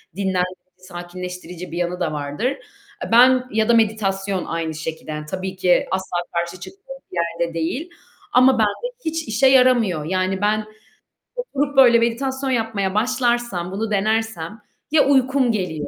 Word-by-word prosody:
dinlendirci, 185 -2 -1 0.2
sakinleştirici 180 -1 -8
bir 170 - -5
yanında 175 -1 -1
vardır. 145 +9 -4
Eee, 405 +10 -8
ben 255 +2 +6
ya 220 +1 +1
da 235 - +6
meditasyon 200 -4 +1
aynı 165 -1 -3
şekilde, 160 0 -6
yani 150 0 -5
tabii 190 +4 -5
ki 180 -1 +2
asla 190 -2 -2 0.2
karşı 170 +1 -3
çıktığım 395 - -11 0.2
bir 180 - -6 0.2
yerde 170 -1 -1
değil 205 - -3 0.4
ama 255 +1 +6
bende 220 - 0
hiç 320 -1 -2
işe 220 +5 +3
yaramıyor, 245 - +4
yani 185 +2 -1
ben 215 +1 +1 0.7
oturup 290 - -3
böyle 240 -3 +7
meditasyon 265 +3 -1
yapmaya 220 -6 -1
başlarsam, 240 -6 0
bunu 215 +3 -3
denersem 215 -2 -1 0.3
ya 300 -3 +5
uykum 265 -2 +3
geliyor 180 -8 -3
210 Hz, 145 wpm, -21 LUFS, 180-255 Hz, 0.7 s, böyle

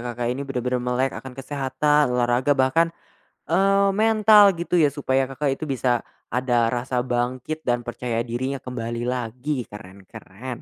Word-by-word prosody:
Kakak 120 0 -2
ini 130 - -5
benar-benar 125 -2 -2
melek 125 +2 0
akan 130 -1 -9
kesehatan, 140 +2 +1
olahraga, 125 +3 +2
bahkan, 135 +6 +3 0.6
eee, 195 +4 +3
mental 215 -2 +5
gitu 170 +1 0
ya, 150 - +5
supaya 135 -2 0
Kakak 135 +1 -1
itu - - -2
bisa, 125 -3 +1 0.3
ada 120 -1 +1
rasa 125 +1 -1
bangkit 125 +5 -3
dan 120 -1 +1
percaya 120 -1 -3
dirinya 125 +4 -3
kembali 120 -2 -5
lagi, 125 +2 -3
keren 100 -2 -12
keren. 120 +6 -9
130 Hz, 145 wpm, -23 LUFS, 120-145 Hz, 0.6 s, mental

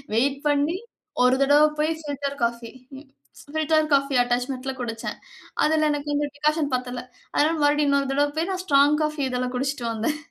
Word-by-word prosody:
Wait 270 +4 +1
பண்ணி 295 +4 +1 0.5
ஒரு 250 +1 +5
தடவ 290 +2 +5
போய் 305 +1 +1
பில்டர் 280 0 -4
காஃபி 235 0 -1 0.9
பில்டர் 310 0 +2
காஃபி 275 0 +2
அட்டாச்மெண்ட்ல 250 +2 -2
குடிச்சேன். 230 -2 -4 0.5
அதில 310 0 +3
எனக்கு 290 0 -3
இந்த 295 +1 +1
டிக்காஷன் 300 0 0
பத்தல, 250 -1 -2 0.3
அதனால 315 +3 +2
மறுபடியும் 290 0 +3
இன்னொரு 280 -1 +1
தடவை 290 +1 +2
போய் 335 +4 0
நான் 370 -1 -3
ஸ்ட்ராங் 290 -1 +4
காஃபி 305 -1 -2
இதில 250 0 -1
குடிச்ட்டு 275 0 -2
வந்தேன். 230 +7 -1
285 Hz, 155 wpm, -24 LUFS, 255-300 Hz, 0.9 s, ஒரு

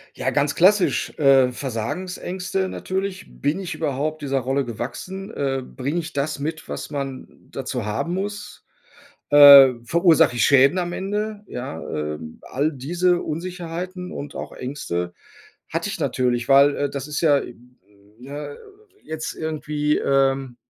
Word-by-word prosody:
Ja, - - -1
ganz 145 0 +1
klassisch, 190 +2 +3
äh, 135 -3 +5
Versagensängste 180 - -3
natürlich. 190 +1 -4
Bin 145 +6 -2
ich 190 -3 -5
überhaupt 155 +1 -2
dieser 140 -1 0
Rolle 135 +2 -1
gewachsen? 160 - -6
Äh, 135 -7 -2
bringe 140 +6 -3
ich 170 0 -6
das 145 +1 -2
mit, 155 +3 -4
was - - -6
man 135 -3 -5 0.2
dazu 125 -3 -4
haben 110 +11 -2
muss? 205 +2 -6 0.6
Äh, 140 -2 +10
verursache 165 0 +4
ich 120 - +2
Schäden 140 +5 +5
am 175 -1 -2
Ende? 210 +2 -3
Ja, 105 -10 -6
äh, 75 -1 -3 0.2
all 145 +4 -1
diese 175 +6 0
Unsicherheiten 180 +2 -5
und 145 0 -7
auch - - -6
Ängste 90 -10 -4 0.6
hatte - - -2
ich - - -5
natürlich, 120 -1 0
weil, 140 +1 +6
äh, 145 -1 -1
das 140 0 -5
ist 145 -1 -3
ja, 145 -4 +4 0.8
ne, 145 +3 -7 0.5
jetzt 160 0 -5
irgendwie, 150 -1 -1
ähm, 135 -2 +1
145 Hz, 140 wpm, -22 LUFS, 135-175 Hz, 0.8 s, Äh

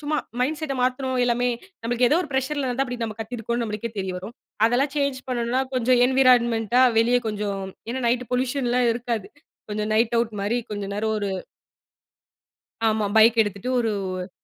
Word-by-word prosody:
சும்மா 305 +1 -1 0.2
மைண்ட்செட் 300 +3 -1
மாத்தணும் 255 0 0
எல்லாமே. 245 0 +1 0.4
நமக்கு 245 +1 +2
ஏதோ 300 - +3
ஒரு 305 - -8
பிரஷ்சர் 265 +3 -1 0.2
அப்படி 250 -2 -4
நம்ம 220 -2 -4
கத்திருக்கோம்னு 235 +1 -3
நம்மளுக்கே 215 +2 -4
தெரிய 190 -1 -2
வரும். 190 +6 -8 0.3
அதெல்லாம் 265 +5 +2
சேஞ்ச் 280 -2 0
பண்ணனும்னா 245 +1 0
கொஞ்சம் 250 0 +3
என்வாயிராய்மன்ட்டா 245 -2 +4 0.2
வெளிய 240 +2 +4
கொஞ்சம் 205 -2 -3 0.3
ஏன்னா, 260 +2 -3
நைட் 245 +1 +1
பொலீயுஷன் 250 +1 0
எல்லாம் 245 0 +3
இருக்காது. 235 -3 -3 0.4
கொஞ்சம் 210 +1 -2
நைட் 230 +1 +2
ஆவுட் 230 -1 0
மாரி, 225 +4 0
கொஞ்ச 205 -1 -4
நேரம் 220 +1 -1
ஒரு 200 -1 -2 1.6
ஆமா. 215 -1 +1
பைக் 225 +1 +6
எடுத்துட்டு 205 +3 -5
ஒரு 195 -4 -3
235 Hz, 155 wpm, -24 LUFS, 215-255 Hz, 1.6 s, பைக்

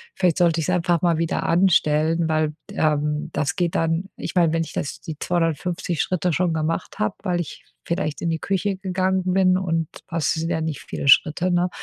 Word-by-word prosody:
vielleicht 180 -4 +2
sollte 170 -2 +3
ich 160 - -1
es 180 - +3
einfach 175 -2 +1
mal 170 -2 +2
wieder 165 0 -1
anstellen, 165 -2 +3
weil, 155 -1 +1 0.2
d - - -10
ähm, 150 +1 0
das 145 -1 -1
geht 175 -3 0
dann 165 +3 0
ich - - -6
meine, 170 -3 +3
wenn 165 0 +1
ich 155 - -9
das 145 - -4
die 155 -2 -7
250 170 -1 -1
Schritte 180 -1 0
schon 175 0 +1
gemacht 160 +1 -2
habe, 105 - 0
weil 180 -3 0
ich 165 - -9 0.2
vielleicht 170 -3 -2
in 170 - -1
die 165 - 0
Küche 195 +3 -1
gegangen 190 0 0
bin, 185 -1 +4
und 165 -4 -1 0.2
das 170 -4 0
sind 165 +1 -2
ja 160 -2 0
nicht 160 -3 -3
viele - - -5
Schritte, 165 +6 +5
ne? 175 0 +2
165 Hz, 210 wpm, -23 LUFS, 155-180 Hz, 0.2 s, Schritte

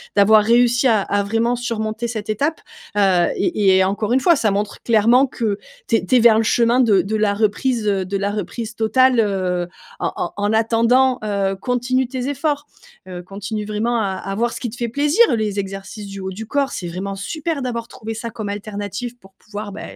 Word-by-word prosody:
d'avoir 210 +1 +6
réussi 240 +3 +3
à 220 -4 +3
à 205 +1 0
vraiment 225 +4 0
surmonter 230 -1 -3
cette 220 -2 -5
étape, 285 +9 -1 0.4
heu. 190 -4 +4
Et 200 - +2
et 190 - +4
encore 205 +4 -1
1 260 - +4
fois, 340 0 +4
ça 220 -5 +1
montre 205 +1 -3
clairement 235 +4 +4
que 225 -5 -2 0.3
tu 230 - +4
es - - -4
tu 255 - +2
es - - +6
vers 225 -2 +6
le 225 - +2
chemin 235 +2 +3
de 220 -6 +4
de 215 +3 -3
la 210 -1 +2
reprise, 220 +3 0
heu 195 -2 0
de 195 +2 -4
la 200 +1 -1
reprise 220 +2 -5
totale, 250 +3 +3
heu, 185 -4 0 0.3
en - - -2
en - - -3
en 205 +1 0
attendant, 230 +3 +3
heu, 200 -2 0
continue 250 +4 -1
tes 255 +1 -4
efforts. 290 0 -1 0.4
Heu, 180 -1 -7
continue 205 +3 -5
vraiment 220 +3 -1
à 205 -3 0
à 195 +1 -5
voir 235 +3 0
ce - - -6
qui 240 - -3
te 220 - -10
fait 240 -2 -2
plaisir, 295 - +3
les 210 -2 -2
exercices 195 +2 -6
du 195 0 -8
haut 190 0 -4
du 215 +4 -7
corps, 280 +4 0
c'est 180 - -5
vraiment 190 +3 -5
super 310 - -3
d'avoir 235 -2 -3
trouvé 225 -2 -7
ça 230 +1 -5
comme 215 -2 -6
alternative 205 +3 -5
pour 195 -4 -20
pouvoir, 210 -1 -7
bah, 200 - -8
220 Hz, 215 wpm, -20 LUFS, 200-245 Hz, 0.4 s, d'avoir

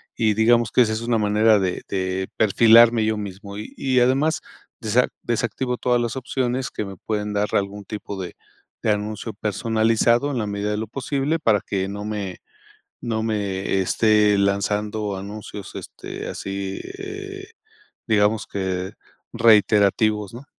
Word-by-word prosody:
Y 110 -2 +2
digamos 115 0 +3
que - - +4
esa 110 -2 +2
es 110 - -3
una 115 0 +1
manera 105 +1 +4
de 95 -2 -1
de 95 0 -2
perfilarme 115 +2 +6
yo 110 0 0
mismo 100 0 -7
y, 105 - -8
y 130 -2 +2
además 140 +5 +2 0.4
desa 115 +2 +2 0.2
desactivo 120 +2 -1
todas 125 0 +1
las 120 +1 -2
opciones 130 -1 -2
que 105 - -4
me 95 0 -8
pueden 105 0 -3
dar 105 0 +1
algún 100 0 -1
tipo 105 -2 -6
de 90 - -7 0.5
de 110 - +3
anuncio 105 +2 -3
personalizado 115 +5 +1
en 135 - -2
la 110 - -1
medida 100 0 -2
de 105 - -1
lo 110 - -2
posible 140 +3 -1
para 110 -9 +2
que 95 -1 -1
no 100 +1 -6
me 105 -4 -4 0.6
no 110 -2 -2
me 100 -3 -1
esté 105 +1 +3
lanzando 105 +1 0
anuncios 100 0 -8
este - - -7
así 95 0 -4 0.2
eh, 395 0 -7 0.6
digamos 105 -1 +2
que 95 -1 -3 0.4
reiterativos 105 -2 +3
¿no? 125 +4 -10
105 Hz, 150 wpm, -22 LUFS, 100-115 Hz, 0.6 s, perfilarme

